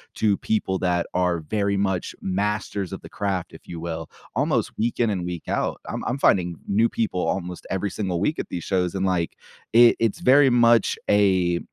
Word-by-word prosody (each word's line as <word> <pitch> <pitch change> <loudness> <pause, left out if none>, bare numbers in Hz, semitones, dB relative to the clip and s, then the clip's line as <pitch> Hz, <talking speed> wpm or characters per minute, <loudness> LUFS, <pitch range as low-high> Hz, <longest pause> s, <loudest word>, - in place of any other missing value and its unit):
to 105 -3 +2
people 95 -3 -1
that 90 -2 0
are 90 -2 +1
very 100 +5 -1
much 95 -3 -1
masters 100 0 -2
of - - -6
the - - -11
craft, 95 -4 -3
if - - -14
you 85 - -7
will, 80 -1 -5 0.3
almost - - +1
week 115 +3 -1
in 115 -3 +2
and 90 -3 -2
week 90 -2 -5
out, - - -1
I'm-I'm 125 - -3
finding 90 -9 +2
new 110 +4 +3
people 105 -6 -1
almost 90 -1 -4
every 95 +1 -2
single 95 -5 -2
week 150 - 0
at - - -4
these 85 - -4
shows, 90 -1 0
and 95 0 0
like, 90 -2 +2
i 115 +7 +2
it's 115 -3 0
very 135 +1 +6
much 120 -2 +4
a 95 -4 +3
95 Hz, 190 wpm, -24 LUFS, 90-110 Hz, 0.3 s, very